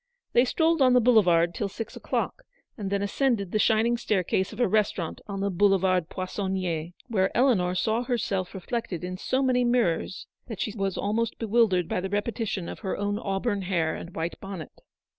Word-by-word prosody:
They 245 Hz, -, +5 dB
strolled 325 Hz, +3 st, +2 dB
on 255 Hz, -1 st, +6 dB
the 250 Hz, -, +6 dB
boulevard 180 Hz, -8 st, +4 dB
till 200 Hz, +1 st, -2 dB
six 220 Hz, +3 st, -7 dB
o'clock, -, -, -2 dB, 0.3 s
and 200 Hz, -4 st, -4 dB
then 200 Hz, 0 st, 0 dB
ascended 205 Hz, -3 st, 0 dB
the 215 Hz, -, +1 dB
shining 225 Hz, +2 st, +3 dB
staircase 190 Hz, -4 st, 0 dB
of 215 Hz, -, -10 dB
a 245 Hz, -, +4 dB
restaurant 195 Hz, -5 st, 0 dB
on 195 Hz, -1 st, -4 dB
the 200 Hz, 0 st, 0 dB
Boulevard 185 Hz, -2 st, +2 dB
Poissonnier, 185 Hz, -4 st, -3 dB, 0.2 s
where 195 Hz, -5 st, +1 dB
Eleanor 205 Hz, -9 st, +3 dB
saw 220 Hz, +5 st, +1 dB
herself 205 Hz, -7 st, -2 dB
reflected 190 Hz, -2 st, -4 dB
in 185 Hz, 0 st, -4 dB
so 260 Hz, +7 st, 0 dB
many 250 Hz, -1 st, +3 dB
mirrors 235 Hz, -7 st, 0 dB, 0.2 s
that 225 Hz, -6 st, -7 dB
she 215 Hz, -, -2 dB
was 195 Hz, -3 st, -2 dB
almost 220 Hz, +3 st, -1 dB
bewildered 215 Hz, -6 st, +2 dB
by 180 Hz, -, -1 dB
the 190 Hz, -, -3 dB
repetition 205 Hz, -3 st, -2 dB
of -, -, -7 dB
her 190 Hz, -4 st, -3 dB
own 205 Hz, +1 st, -1 dB
auburn 200 Hz, 0 st, -1 dB
hair 175 Hz, -4 st, 0 dB
and 170 Hz, -, -8 dB
white 165 Hz, +1 st, -3 dB
bonnet. 195 Hz, -6 st, -7 dB
200 Hz, 180 wpm, -27 LUFS, 185-230 Hz, 0.3 s, on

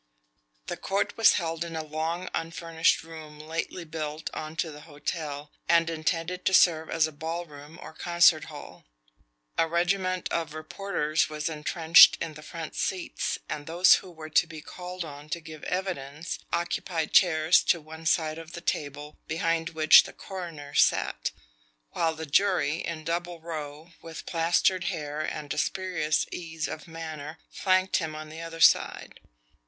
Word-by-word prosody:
The -, -, -4 dB
court 200 Hz, +1 st, -1 dB
was 225 Hz, -, +6 dB
held 165 Hz, -2 st, -1 dB
in 170 Hz, -1 st, -6 dB
a 160 Hz, -, -2 dB
long 160 Hz, +4 st, -3 dB
unfurnished 165 Hz, 0 st, 0 dB
room 160 Hz, -2 st, -10 dB
lately 165 Hz, +3 st, -4 dB
built 155 Hz, -1 st, -5 dB
onto 155 Hz, +1 st, -3 dB
the 150 Hz, 0 st, -11 dB
hotel, 150 Hz, -1 st, -5 dB, 0.2 s
and 170 Hz, 0 st, +4 dB
intended 165 Hz, +2 st, -2 dB
to 190 Hz, -, +4 dB
serve 160 Hz, -2 st, +4 dB
as 165 Hz, -1 st, +3 dB
a 155 Hz, -, -5 dB
ball 165 Hz, +3 st, -4 dB
room 150 Hz, +1 st, -12 dB
or -, -, -10 dB
concert 170 Hz, -2 st, +4 dB
hall. -, -, -11 dB, 0.8 s
A 165 Hz, -, +4 dB
regiment 185 Hz, +2 st, 0 dB
of 160 Hz, -2 st, -2 dB
reporters 155 Hz, -1 st, -1 dB
was 155 Hz, +1 st, -3 dB
entrenched 160 Hz, +1 st, +6 dB
in 165 Hz, -2 st, -4 dB
the 155 Hz, -, -11 dB
front 160 Hz, 0 st, -7 dB
seats, 185 Hz, -2 st, -2 dB
and 145 Hz, -1 st, -5 dB
those 175 Hz, +3 st, +6 dB
who 190 Hz, -, -12 dB
were 160 Hz, -2 st, -10 dB
to 165 Hz, -, +4 dB
be 160 Hz, -1 st, -9 dB
called 180 Hz, +3 st, -7 dB
on 145 Hz, 0 st, -10 dB
to 170 Hz, -, -2 dB
give 155 Hz, -2 st, -11 dB
evidence 170 Hz, -4 st, -3 dB
occupied 170 Hz, -1 st, -2 dB
chairs 160 Hz, -3 st, +5 dB
to 170 Hz, -, +3 dB
one 160 Hz, +1 st, -8 dB
side 155 Hz, 0 st, +1 dB
of 165 Hz, 0 st, -11 dB
the 170 Hz, -, -6 dB
table 145 Hz, -2 st, -4 dB
behind 165 Hz, 0 st, 0 dB
which 160 Hz, -1 st, +7 dB
the -, -, -9 dB
coroner 165 Hz, -7 st, -8 dB
sat, -, -, +2 dB, 0.6 s
while 165 Hz, -1 st, 0 dB
the 160 Hz, +1 st, -6 dB
jury, 160 Hz, -2 st, +2 dB
in 160 Hz, -1 st, -5 dB
double 170 Hz, +1 st, -3 dB
row, 155 Hz, 0 st, -7 dB
with 165 Hz, -1 st, -9 dB
plastered 175 Hz, +2 st, +2 dB
hair 155 Hz, -4 st, -3 dB
and 150 Hz, -2 st, -4 dB
a -, -, -2 dB
spurious 180 Hz, -5 st, 0 dB
ease 160 Hz, -2 st, -4 dB
of 155 Hz, -, -7 dB
manner, 160 Hz, -2 st, -7 dB
flanked 185 Hz, 0 st, +2 dB
him 160 Hz, -3 st, -3 dB
on 155 Hz, 0 st, -7 dB
the 160 Hz, +1 st, -8 dB
other 165 Hz, 0 st, -7 dB
side. -, -, +3 dB
160 Hz, 160 wpm, -27 LUFS, 155-170 Hz, 0.8 s, which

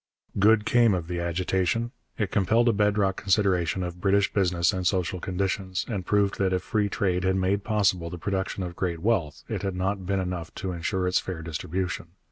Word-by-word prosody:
Good 105 Hz, +1 st, +5 dB
came 115 Hz, -5 st, +4 dB
of 85 Hz, -2 st, -4 dB
the 90 Hz, 0 st, -3 dB
agitation. 90 Hz, +6 st, 0 dB, 0.3 s
It 105 Hz, -4 st, -1 dB
compelled 110 Hz, +5 st, +3 dB
a 115 Hz, -, +4 dB
bed 105 Hz, 0 st, +2 dB
rock 95 Hz, -2 st, +1 dB
consideration 95 Hz, -2 st, +1 dB
of 90 Hz, 0 st, -6 dB
British 100 Hz, +1 st, +2 dB
business 90 Hz, -2 st, +2 dB
and 90 Hz, -2 st, -1 dB
social 95 Hz, -1 st, 0 dB
conditions, 95 Hz, 0 st, -2 dB
and 105 Hz, -6 st, -3 dB
proved 100 Hz, +1 st, +1 dB
that 95 Hz, -1 st, +2 dB
if 90 Hz, 0 st, 0 dB
free 105 Hz, 0 st, 0 dB
trade 90 Hz, -3 st, 0 dB
had 95 Hz, 0 st, +2 dB
made 95 Hz, +1 st, +1 dB
possible 95 Hz, -6 st, +1 dB
the 90 Hz, -, -6 dB
production 95 Hz, +1 st, -2 dB
of 85 Hz, -1 st, -5 dB
great 85 Hz, -2 st, -1 dB
wealth, 95 Hz, -10 st, 0 dB
it -, -, -3 dB
had 95 Hz, -2 st, -2 dB
not 95 Hz, 0 st, -2 dB
been 100 Hz, 0 st, +1 dB
enough 90 Hz, -3 st, -4 dB
to 95 Hz, -, -3 dB
ensure 90 Hz, +2 st, -1 dB
its 90 Hz, -, +3 dB
fair 85 Hz, -4 st, -6 dB
distribution. 85 Hz, +2 st, -3 dB
95 Hz, 200 wpm, -26 LUFS, 90-100 Hz, 0.3 s, Good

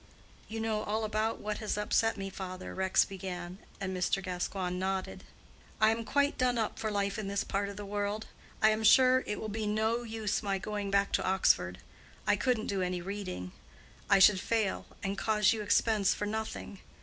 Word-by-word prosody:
"You 225 Hz, +1 st, -5 dB
know 220 Hz, -1 st, 0 dB
all 215 Hz, +1 st, -1 dB
about 215 Hz, +1 st, -1 dB
what 210 Hz, 0 st, -3 dB
has 215 Hz, -2 st, -2 dB
upset 225 Hz, +2 st, +1 dB
me, 195 Hz, 0 st, -5 dB
father," 185 Hz, -1 st, -6 dB
Rex 190 Hz, 0 st, +3 dB
began, 185 Hz, -1 st, -6 dB, 0.2 s
and 190 Hz, -1 st, -3 dB
Mr. 185 Hz, +1 st, +1 dB
Gascoigne 180 Hz, 0 st, -2 dB
nodded. 190 Hz, +1 st, -3 dB, 0.5 s
"I 215 Hz, 0 st, +5 dB
am 225 Hz, 0 st, -2 dB
quite 285 Hz, +5 st, +1 dB
done 250 Hz, -2 st, +2 dB
up 220 Hz, -2 st, -2 dB
for 220 Hz, -, -1 dB
life 200 Hz, 0 st, -1 dB
in 210 Hz, -, -4 dB
this 200 Hz, 0 st, -1 dB
part 200 Hz, 0 st, -2 dB
of 200 Hz, -, -8 dB
the 205 Hz, -, -6 dB
world. 205 Hz, +1 st, -2 dB, 0.4 s
I 215 Hz, -, +7 dB
am 215 Hz, +1 st, 0 dB
sure 255 Hz, +3 st, +6 dB
it 210 Hz, -, -2 dB
will 220 Hz, -, -4 dB
be 215 Hz, 0 st, -3 dB
no 220 Hz, +3 st, +1 dB
use 220 Hz, -3 st, -2 dB
my 200 Hz, -2 st, -1 dB
going 205 Hz, +1 st, -4 dB
back 200 Hz, 0 st, +2 dB
to -, -, +1 dB
Oxford. 140 Hz, -, +2 dB, 0.5 s
I -, -, +4 dB
couldn't 220 Hz, +1 st, 0 dB
do 195 Hz, -2 st, -1 dB
any 180 Hz, 0 st, -1 dB
reading. 175 Hz, -, -5 dB, 0.6 s
I -, -, +7 dB
should 190 Hz, 0 st, +7 dB
fail, 220 Hz, -1 st, -1 dB, 0.2 s
and 195 Hz, +1 st, -2 dB
cause 210 Hz, -1 st, +3 dB
you 220 Hz, -, -3 dB
expense 210 Hz, -1 st, +2 dB
for 210 Hz, -, -3 dB
nothing. 215 Hz, -2 st, -4 dB
205 Hz, 195 wpm, -31 LUFS, 190-220 Hz, 0.6 s, I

